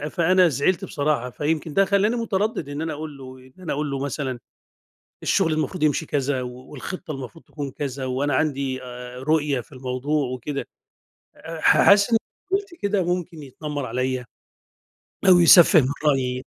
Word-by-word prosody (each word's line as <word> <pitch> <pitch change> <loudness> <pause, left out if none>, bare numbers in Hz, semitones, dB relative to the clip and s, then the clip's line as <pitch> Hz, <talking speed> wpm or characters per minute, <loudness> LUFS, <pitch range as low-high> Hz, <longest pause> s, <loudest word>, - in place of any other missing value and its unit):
فأنا 180 +1 +4
زعلت 170 +7 0
بصراحة، 145 -7 -1
فيمكن 150 +3 -2
ده 195 - +4
خلاني 200 +4 +2
متردِّد 210 - -1
إن 145 +1 -4
أنا 160 -1 -2
أقول 150 -1 -7
له 130 -1 -10
إن 130 0 -18
أنا 165 - -2
أقول 150 0 -2
له 135 - -2
مثلًا 135 -2 -3 0.8
الشغل 165 -5 +2
المفروض 155 +2 -2
يمشي 155 +1 +2
كذا 140 -2 -1
و 125 - -4 0.2
والخطة 155 +4 -7
المفروض 135 +3 -8
تكون 145 -3 -6
كذا 135 -1 -4
وأنا 130 +2 0
عندي 135 -3 -1
آآ، 125 0 -8
رؤية 145 -1 +1
في - - -22
الموضوع 130 +2 -2
وكده، 140 +3 -4 0.7
أ 165 -1 -8
ح - - +5
حاسس 200 +2 +6
إن 230 - +5 0.4
لو 390 - +4
فضلت 395 -3 -10
كده 200 -1 +1
ممكن 170 -3 -7
يتنمّر 145 0 -5
عليَّ 130 0 -2 1.0
أو 180 -1 +8
يسفِّه 170 0 +8
من 130 - 0 0.2
رأيي. 130 -3 +1
145 Hz, 165 wpm, -23 LUFS, 130-170 Hz, 1.0 s, أو